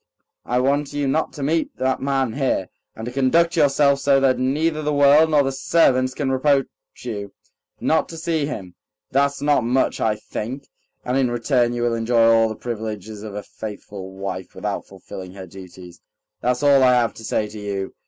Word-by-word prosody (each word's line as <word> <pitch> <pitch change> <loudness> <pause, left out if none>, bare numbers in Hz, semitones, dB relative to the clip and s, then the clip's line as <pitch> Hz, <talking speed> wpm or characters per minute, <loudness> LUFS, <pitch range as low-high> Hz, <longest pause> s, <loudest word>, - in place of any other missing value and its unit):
"I 125 - 0
want 140 +2 0
you 145 -1 -1
not 155 +4 0
to 145 - -6
meet 160 +3 -1
that 130 0 0
man 135 -4 0
here, 130 -9 -1 0.3
and 110 - -7
to 120 - -5
conduct 165 +7 +2
yourself 140 -2 +3
so 140 0 +3
that 135 -2 +2
neither 155 +5 0
the 150 0 -1
world 145 +2 +5
nor 150 -2 +4
the 135 - -1
servants 130 -2 +2
can 135 -2 -1
reproach 135 +1 +2 0.4
you... 100 -5 -6 0.5
not 160 - +1
to 165 - -8
see 160 -3 -1
him. 95 -11 -6 0.4
That's 140 +1 +1
not 145 -4 +3
much, 125 +3 0
I 110 -1 +2
think. 130 +6 -6 0.4
And 125 +2 0
in 130 -2 +2
return 120 0 +1
you 120 0 -2
will 120 -1 +1
enjoy 115 0 +2
all 115 0 +4
the 110 - -5
privileges 110 -3 -6
of 105 -1 -8
a 105 - -5
faithful 105 -3 -8
wife 95 -1 -6
without - - -4
fulfilling 95 -1 -10
her 95 -1 -8
duties. 90 -1 -12 0.4
That's 125 +2 0
all 140 -1 +5
I 130 -1 +5
have 120 -2 +1
to 115 - -12
say 110 -1 -1
to 105 0 -9
you. 100 -2 -4
130 Hz, 195 wpm, -22 LUFS, 110-140 Hz, 0.5 s, world